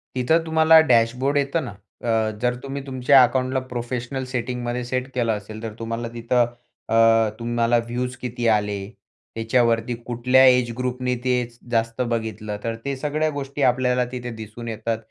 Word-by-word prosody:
तिथं 160 +7 +2
तुम्हाला 160 0 +6
डॅशबोर्ड 125 +5 +2
येतं 140 +3 0
ना. 120 - -6 0.3
अ, 110 -2 +1
जर 125 0 +1
तुम्ही 140 0 -5
तुमच्या 130 +1 +5
अकाउंटला 130 +1 +1
प्रोफेशनल 125 +2 -3
सेटिंगमध्ये 125 0 -3
सेट 130 +1 -2
केलं 120 -2 +1
असेल 110 +1 -7
तर 110 -2 -5
तुम्हाला 115 +1 -4
तिथं, 120 +1 +2 0.5
अ, 115 -1 +5
तुम्हाला 120 0 +1
व्ह्यूज 125 +1 -3
किती 120 -1 -2
आले, 105 -2 +1 0.6
त्याच्यावरती 115 +1 +1
कुठल्या 125 +2 +4
एजग्रुपने 125 0 +1
ते 125 -1 +2 0.4
जास्त 115 +1 0
बघितलं? 110 -3 -3
तर 115 -1 -2
ते 140 - -1
सगळ्या 155 +2 -1
गोष्टी 140 0 -5
आपल्याला 125 0 +2
तिथे 125 -1 -5
दिसून 110 +2 -9
येतात. 115 0 -2
120 Hz, 145 wpm, -23 LUFS, 115-130 Hz, 0.6 s, तुम्हाला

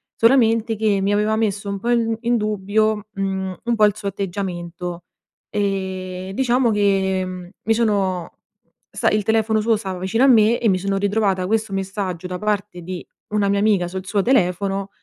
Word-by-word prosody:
solamente 230 -2 +3
che 210 -2 +1
mi 200 +1 +1
aveva 215 +1 +1
messo 205 -2 -1
un 200 -1 -3
po' 240 +3 -1
in 230 -1 +2
d - - -4
in 240 +1 +1
dubbio, 210 0 0
mhmm, 190 -1 -2
un 235 0 0
po' 215 -1 +5
il 205 0 +2
suo 200 -2 -3
atteggiamento. 175 -3 -5 0.5
E, 190 -2 -3
diciamo 250 -2 +2
che, 195 -2 +1
mhmm, 180 -1 -7
mi 225 - +2
sono 200 -6 0 0.6
sta - - +1
il 210 0 +2
telefono 220 0 +2
suo 225 0 +2
stava 190 -3 -5
vicino 225 +7 +1
a - - +6
me 230 -2 +5
e 225 - +2
mi 185 -1 +2
sono 195 +1 -1
ritrovata 200 -2 +1
questo 220 0 0
messaggio 190 -2 -3
da 180 0 -5
parte 205 -3 -2
di 180 +1 -6 0.2
una 205 -1 +1
mia 200 0 +2
amica 200 -4 +2
sul 185 +1 -6
suo 200 -1 +1
telefono 195 -4 +1
200 Hz, 185 wpm, -21 LUFS, 190-220 Hz, 0.6 s, a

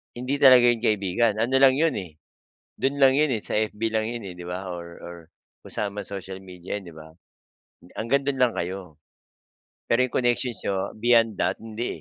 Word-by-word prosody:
hindi 130 +3 -3
talaga 130 -3 +8
'yon 120 -1 +1
kaibigan. 105 0 +1
Ano 130 +3 +1
lang 135 -1 +6
'yon, 160 -1 +2
eh, 85 -5 -10 0.6
do'n 140 +1 -1
lang 135 0 +6
'yon, 150 -2 +2
eh, 110 - -1
sa - - -4
FB 110 0 -2
lang 110 0 -1
'yon, 120 -3 -6
eh, 90 - -7
'di 90 - -9
ba? 90 +2 -5
Or 85 -1 -6
or 85 0 -9 0.5
kung - - -12
saan 100 -1 -3
mang 100 - -4
social 95 -1 -7
media, 90 +1 -7
eh, 100 - -6
'di 85 - -11
ba? 80 0 -12 0.9
Hanggang 135 +5 +1
do'n 135 -1 -1
lang 125 -2 +3
kayo. 90 -3 -5 0.9
Pero 130 +2 +4
yung 125 - -15
connections 120 -2 0
niyo 100 - -1 0.2
beyond 115 -1 +4
that, - - 0
hindi, 115 +2 -4
110 Hz, 200 wpm, -25 LUFS, 95-125 Hz, 0.9 s, talaga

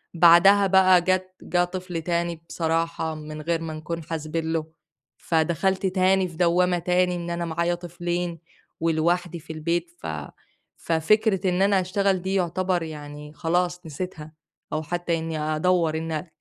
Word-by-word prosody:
بعدها 175 +4 +7
بقى 185 -1 +6
جت 185 +1 0
جه 175 0 +1
طفل 180 -2 -5
تاني 170 -1 -2
بصراحة 165 -1 -1
من 155 0 -7
غير 165 +1 -1
ما 160 -1 -5
نكُون 160 +1 -5
حاسبين 160 0 -3
له، 160 -1 -1 0.5
فدخلت 170 +4 0
تاني 185 0 +2
في 160 - -13
دوامة 180 0 +3
تاني 180 +1 +1
إن 175 0 -5
أنا 170 0 -2
معايا 170 +1 0
طفلين 175 0 -4 0.4
ولوحدي 170 +2 0
في 160 +1 -9
البيت، 170 +2 -2
ف - - -6 0.7
ففكرة 195 +4 +2
إن 180 +1 0
أنا 195 -1 +4
أشتغل 190 0 0
دي 190 +1 -1
يعتبر 180 -1 0
يعني 150 -1 -8
خلاص 175 +2 -1
نسيتها 155 -1 -6 0.4
أو 155 +1 -1
حتّى 175 +1 -1
إني 160 -1 -4
أدوّر 155 +1 +1
إن 160 +1 -3
170 Hz, 145 wpm, -24 LUFS, 160-180 Hz, 0.7 s, بعدها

